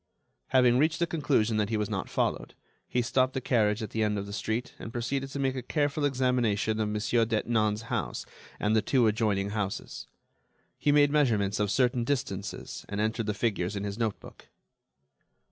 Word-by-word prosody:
Having 125 -1 +4
reached 155 +3 +2
the 170 - +2
conclusion 135 -9 +1
that 105 -1 +1
he 110 - 0
was 105 -1 -1
not 95 -3 -3
followed, - - -1 0.3
he 125 - 0
stopped 130 +2 +1
the - - +1
carriage 110 -4 +1
at 105 - -6
the 110 - -1
end 105 -1 +1
of 100 - -3
the 100 - -8
street, 110 +4 -2
and 115 - -7
proceeded 135 +4 -2
to 140 - -6
make 135 -1 0
a 130 - -3
careful 145 +3 0
examination 125 -5 +1
of 105 -1 0
Monsieur 105 +2 +1
Detinan's 110 -1 0
house 115 - -3 0.3
and 105 +1 +1
the 110 - +4
two 125 +3 +2
adjoining 105 -2 +1
houses. 105 -2 -4 0.7
He 145 - +3
made 145 -1 +5
measurements 110 -10 +2
of 105 -1 +1
certain 125 +1 +2
distances 110 -7 -3
and 100 - -3
entered 110 +1 -1
the 105 - -1
figures 105 -3 -1
in 100 - -3
his 100 +2 -4
notebook. 110 -3 -4
110 Hz, 185 wpm, -28 LUFS, 105-130 Hz, 0.7 s, made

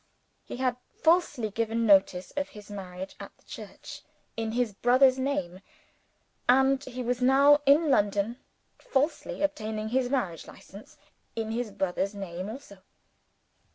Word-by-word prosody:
He - - -8
had 255 -1 0 0.3
falsely 305 - +2
given 230 +2 -1
notice 190 -3 +3
of 285 0 -3
his 210 -1 -13
marriage 190 -1 -7
at - - -10
the - - -30
church, - - -10 0.3
in 225 -1 -3
his 240 -3 0
brother's 255 +4 +4
name; 225 -10 -2 0.9
and 265 +1 +4
he 255 0 -6
was 245 +1 -1
now 280 +3 +6
in 295 +2 +5
London, 205 0 +1 0.4
falsely 300 - -1
obtaining 220 -6 -2
his 250 +1 0
Marriage 195 - -2
License, 200 +3 -14 0.4
in 220 -1 -3
his 235 0 -2
brother's 195 +1 -2
name 185 -1 -6
also. 220 -5 -10
230 Hz, 135 wpm, -28 LUFS, 200-265 Hz, 0.9 s, now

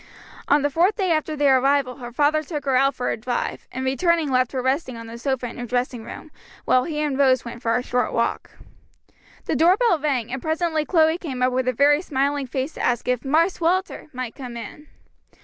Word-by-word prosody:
On 290 0 +3
the 290 - +1
fourth 355 +8 +2
day 380 -4 0
after 310 -1 0
their 280 -3 +4
arrival 270 -1 +1
her 240 -2 -8
father 295 +4 +2
took 300 -1 -6
her 270 -2 +1
out 275 +2 +3
for 250 - -2
a - - -2
drive, 245 +2 -3
and 260 +1 -4
returning 320 +2 +1
left 255 -1 +2
her 265 - -2
resting 260 -1 -1
on 230 - -8
the 230 +1 -9
sofa 265 -1 -2
in 240 - -7
her 245 - -4
dressing 245 -1 -2
room, 295 +6 -10 0.3
while 255 0 +3
he 310 -3 -3
and 285 -3 -1
Rose 260 -2 +3
went 235 0 -8
for 230 -2 +1
a 250 - 0
short 250 -2 -1
walk. 230 - -1 1.0
The - - -1
door 350 +4 +4
bell 460 -9 +2
rang, 260 -5 -1
and 265 - -4
presently 315 0 -1
Chloe 320 0 +3
came 265 -8 -4
up 255 0 +2
with 255 0 0
a - - +3
very 290 +4 +3
smiling 280 -3 -1
face 265 +4 -3
to - - -7
ask 240 -1 0
if 250 -1 0
"Marse 325 +7 +1
Walter" 365 +3 0
might 255 -3 -5
come 250 -4 -8
in. 265 +7 -9
270 Hz, 225 wpm, -23 LUFS, 250-310 Hz, 1.0 s, their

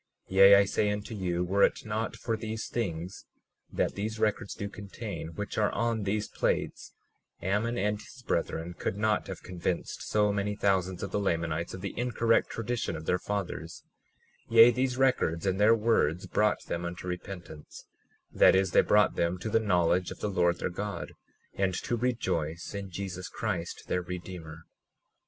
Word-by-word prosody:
37:9 - - -5
Yea, 95 +1 +10
I 100 0 +6
say 105 +2 +1
unto 105 +2 -3
you, 90 -4 -1
were 95 +3 +1
it - - +3
not 110 +1 -2
for 115 - -2
these 110 0 -4
things 90 -5 -4 0.5
that - - 0
these 110 +2 -3
records 110 0 0
do 100 - -4
contain, 100 -4 -7
which 105 +2 -3
are 105 - +2
on 115 -3 0
these 105 +2 -1
plates, - - -2 0.5
Ammon 105 +5 0
and 105 0 0
his 125 - -14
brethren 85 -3 -2
could 95 - -3
not 105 0 +1
have 95 - -7
convinced 90 -1 -3
so 105 -1 +2
many 100 +1 -1
thousands 95 -3 0
of 100 - -4
the - - 0
Lamanites 85 -3 -1
of 95 - -8
the 100 - -4
incorrect 115 -2 +2
tradition 115 -6 -2
of 80 0 -7
their 90 - +1
fathers; 95 -5 -4 0.7
yea, 115 +1 +8
these 125 +1 0
records 125 -11 +2
and 95 0 0
their 110 +2 +6
words 105 -7 +1
brought 105 0 +1
them 85 - -3
unto 85 +1 -5
repentance; 90 -4 -7 0.5
that - - +6
is, 95 -1 +2
they - - +6
brought 105 -2 +4
them 85 +1 0
to 100 +5 -5
the 115 - +4
knowledge 90 -3 +2
of - - -7
the 105 - -2
Lord 85 -2 +2
their 90 - -2
God, 100 -1 -5 0.4
and 95 -2 0
to 120 - -2
rejoice 95 -10 -2
in 100 -1 -5
Jesus 95 0 -5
Christ 90 -7 -3
their 90 - 0
Redeemer. 85 -3 -7
100 Hz, 175 wpm, -29 LUFS, 90-110 Hz, 0.7 s, Yea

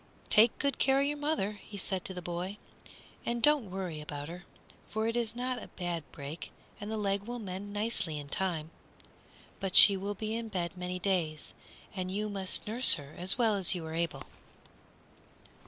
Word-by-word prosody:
"Take 220 +2 +6
good 280 -1 -1
care 270 0 +4
of 280 - +3
your 295 +1 0
mother," 290 -9 0
he 205 - -9
said 190 -1 -2
to 190 - -4
the 180 - -6
boy, 175 +4 -3 0.7
"and 235 0 -1
don't 285 -4 +5
worry 180 -5 -4
about 145 0 -6
her, 175 +2 -8 0.4
for 220 +1 -1
it 230 +1 0
is 235 -1 -1
not 250 0 -2
a - - -8
bad 175 -3 -3
break 145 +4 -7 0.3
and 205 - -6
the 220 - -2
leg 200 -1 0
will 245 +1 -3
mend 200 -2 -6
nicely 205 -7 -1
in 145 -1 -6
time; 165 -1 -1 0.9
but 195 -2 -2
she 200 - +11
will 200 +2 -3
be 215 +2 -3
in 230 0 -3
bed 185 -3 -3
many 180 0 -3
days, 175 -5 -1 0.4
and 185 -1 -2
you 210 +3 -2
must 195 -2 +1
nurse 235 +4 +4
her 145 0 -9
as 185 +4 +3
well 230 -3 +4
as 195 -2 +1
you 170 -2 -4
are 160 - -5
able." 165 -1 -1
195 Hz, 190 wpm, -31 LUFS, 175-220 Hz, 0.9 s, she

